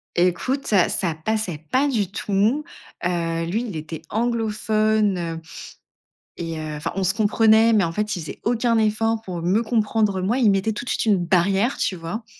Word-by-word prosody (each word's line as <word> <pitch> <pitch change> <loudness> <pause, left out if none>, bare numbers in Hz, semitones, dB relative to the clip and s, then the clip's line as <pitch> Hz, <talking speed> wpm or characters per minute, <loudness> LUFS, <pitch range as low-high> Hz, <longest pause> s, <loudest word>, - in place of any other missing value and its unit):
Écoute, 185 +11 +1
ça 195 -5 +3
ça 175 -4 0
passait 180 0 -2
pas 275 +3 +3
du 220 -8 0
tout, 210 +9 0 0.4
heu, 165 -1 -1
lui, 205 +8 -1
il 200 - -6
était 155 +1 -7
anglophone, 215 -3 +1 0.2
heu 165 - -8 1.0
et 165 -2 -4
heu, 155 -1 -5
enfin, 150 - -3
on 195 - 0
se 190 +2 +1
comprenait. 220 +1 +4
Mais 210 -5 +4
en 165 - -2
fait, 210 +2 -2
il 175 - -4
faisait 160 - -8
aucun 235 0 +1
effort 220 +1 +1
pour 180 -5 -6
me 195 +7 +2
comprendre, 215 -3 +1
moi. 220 +7 +1
Il 230 -5 +4
mettait 195 +3 +1
tout 215 +3 -6
de - - -5
suite - - -1
une 195 -5 +3
barrière, 195 +7 +2
tu - - 0
vois? 175 +7 -6
210 Hz, 190 wpm, -22 LUFS, 175-225 Hz, 1.0 s, comprenait